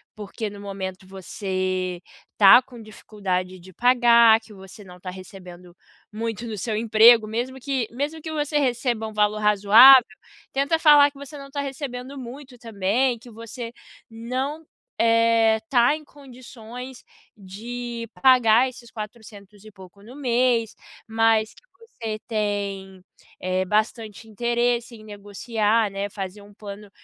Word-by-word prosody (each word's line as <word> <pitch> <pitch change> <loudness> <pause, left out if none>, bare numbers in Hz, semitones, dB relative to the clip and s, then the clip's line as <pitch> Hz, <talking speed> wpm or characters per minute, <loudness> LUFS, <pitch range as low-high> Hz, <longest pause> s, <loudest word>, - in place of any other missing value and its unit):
porque 210 +1 -6
no 200 - -12
momento 190 -2 -7
você 185 -1 -4 0.4
tá 195 +2 +9
com 245 -3 -14
dificuldade 185 -4 -5
de 185 +2 -15
pagar, 235 -2 +5
que 225 -1 -19
você 195 +2 -13
não 180 -1 -14
tá 185 0 -7
recebendo 180 -2 -13 0.4
muito 225 +1 -5
no 220 -2 -6
seu 215 +3 -3
emprego. 225 +1 +5
Mesmo 245 +4 -4
que 260 -3 -2
mesmo 290 +6 -4
que 315 +1 -7
você 295 -1 -2
receba 245 -4 -1
um 220 - -9
valor 210 0 +1
razoável, 210 +6 +7 0.5
tenta 280 +4 0
falar 290 -2 +6
que 275 - -19
você 280 +1 -10
não 275 0 -11
tá 285 0 -3
recebendo 270 -1 -7
muito 260 +1 -10
também, 230 +3 -1
que 240 +2 -15
você 230 +1 -9 0.4
não, 255 +7 -5 0.3
eh, 230 -1 +3
tá 245 +2 +3
em 310 - -10
condições 255 -3 -12 0.3
de 230 +4 -7
pagar 250 -1 +5
esses 245 -2 -14
quatrocentos 210 -2 -11
e 215 - -13
pouco 190 0 -16
no 240 +5 -13
mês, 245 -4 0 0.3
mas 225 -1 +1
que - - -21 0.2
você 225 - -7
tem, 200 -3 -4 0.4
eh, 185 0 -1
bastante 215 +2 -2
interesse 240 +2 -1
em 215 - -14
negociar, 210 +1 -1
né, 200 +1 -4
fazer 195 0 -7
um 205 0 -17
plano 205 0 -10
225 Hz, 140 wpm, -23 LUFS, 205-245 Hz, 0.5 s, tá